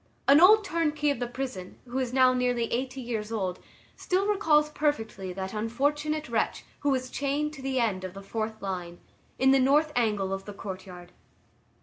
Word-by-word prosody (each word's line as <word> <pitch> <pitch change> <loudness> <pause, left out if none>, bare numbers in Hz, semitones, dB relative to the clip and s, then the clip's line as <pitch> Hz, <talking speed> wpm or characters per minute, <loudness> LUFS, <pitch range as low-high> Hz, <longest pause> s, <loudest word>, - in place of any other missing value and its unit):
An 280 +3 +7
old 425 +4 +8
turnkey 305 -5 0
of 280 - -3
the 245 - -2
prison, 245 -7 -6
who 250 +2 -3
is 255 -2 -2
now 255 0 +5
nearly 250 -1 +1
eighty 260 +2 -2
years 225 -3 -4
old, 190 -5 -2 0.4
still 375 +2 0
recalls 315 -8 +3
perfectly 225 -11 -2
that 190 +2 -5
unfortunate 295 +8 -1
wretch 230 -3 -1
who 290 - 0
was 255 -2 -1
chained 290 +2 -1
to 275 - -10
the 265 -1 -1
end 205 -6 0
of 185 0 -6
the 195 - -9
fourth 220 +1 -4
line, 180 -3 -5 0.4
in 265 +1 +4
the 270 - +5
north 295 +4 +3
angle 210 -5 +1
of 195 0 -5
the 205 - -7
courtyard. 185 -3 -8
250 Hz, 185 wpm, -28 LUFS, 205-290 Hz, 0.4 s, old